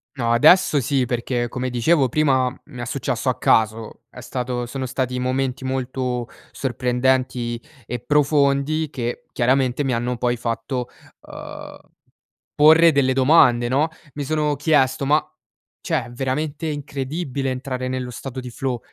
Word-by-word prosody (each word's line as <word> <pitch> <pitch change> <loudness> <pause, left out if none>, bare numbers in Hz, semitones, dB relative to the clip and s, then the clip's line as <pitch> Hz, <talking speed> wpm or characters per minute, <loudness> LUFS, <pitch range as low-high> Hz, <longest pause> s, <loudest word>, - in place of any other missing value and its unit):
No, 115 -3 -1
adesso 150 +5 +5
sì. 130 0 +1
Perché 120 0 -1
come 125 +1 -4
dicevo 130 +3 +3
prima 130 -2 +2
m - - -16
mi 125 -5 -9
è - - -4
successo - - -2
a - - -1
caso, 110 0 +1
è - - -11
stato 125 -1 -3
sono 130 +1 -4
stati 125 0 -2
momenti 130 +1 -1
molto 125 -2 -2 0.2
sorprendenti 125 -2 0 0.3
e 125 - -3
profondi 145 +2 +2
che 120 -4 -4
chiaramente 130 +2 +1
mi 135 - -1
hanno 120 +1 -1
poi 120 0 0
fatto, 120 +2 -3 0.3
uhm, - - -10 0.7
porre 160 +3 +7
delle 135 -3 +2
domande, 130 -3 +4
no, 145 +5 +2 0.2
mi 145 - -4
sono 150 0 0
chiesto, 135 -2 +2
ma, 150 +1 +5 0.6
cioè - - -1
è 120 - -11
veramente 140 +5 -3
incredibile 140 -1 -3
entrare 130 0 -4
nello 130 -1 -3
stato 130 +1 -7
di 125 -1 -7
flow. 130 -1 -3
130 Hz, 145 wpm, -22 LUFS, 125-140 Hz, 0.7 s, porre